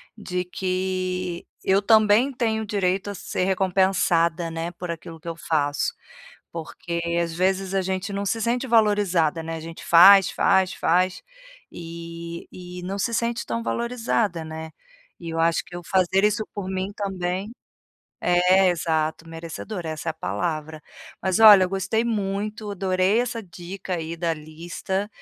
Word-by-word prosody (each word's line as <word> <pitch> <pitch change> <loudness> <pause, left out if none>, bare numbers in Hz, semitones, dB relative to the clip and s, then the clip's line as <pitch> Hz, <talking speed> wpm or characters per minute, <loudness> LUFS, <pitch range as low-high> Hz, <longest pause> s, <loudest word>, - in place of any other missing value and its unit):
de 180 -4 -3
que 185 -1 -2 0.2
eu 195 +1 +3
também 220 +4 +4
tenho 220 -3 -1
direito 195 -1 0
a 200 - -5
ser 180 - -2
recompensada, 180 -3 +2
né, 165 +1 -4
por 175 0 -5
aquilo 165 0 -8
que 165 - -14
eu 165 - -3
faço. 145 -3 0 0.6
Porque, 170 +1 -5 0.2
às 170 -1 -3
vezes, 190 +1 0
a 190 - +2
gente 190 +2 -3
não 200 0 -2
se 225 +3 -1
sente 240 +3 0
valorizada, 205 -8 +2
né? 165 0 -5
A - - -6
gente 165 +1 -9
faz, 195 +3 +8
faz, 190 -1 +2
faz, 180 +2 +1 0.5
e 170 0 -8
e 180 0 -9
não 195 +2 -4
se 230 - -1
sente 235 +1 -1
tão 115 -1 -2
valorizada, 220 - -1
né? 160 0 -7 0.5
E 165 -1 -6
eu 165 - -3
acho 165 0 +2
que 180 - -14
eu 175 - -7
fazer 190 +2 +2
isso 210 +1 +2
por 195 -2 -5
mim, 190 +1 -2
também. 190 +1 -3 0.7
É, 180 +2 +4
exato, 160 -1 -1
merecedora, 165 +2 -6
essa 155 +1 -4
é - - +1
a - - -20
palavra. 155 - -3 0.4
Mas 190 +1 0
olha, 205 -4 +9
eu - - -6
gostei 195 +4 0
muito, 210 -1 -2
adorei 190 +2 +1
essa 235 -2 -2
dica 180 +1 -7
aí 165 0 -5
da 165 0 0
lista. 170 +6 -5
185 Hz, 155 wpm, -24 LUFS, 170-200 Hz, 0.7 s, olha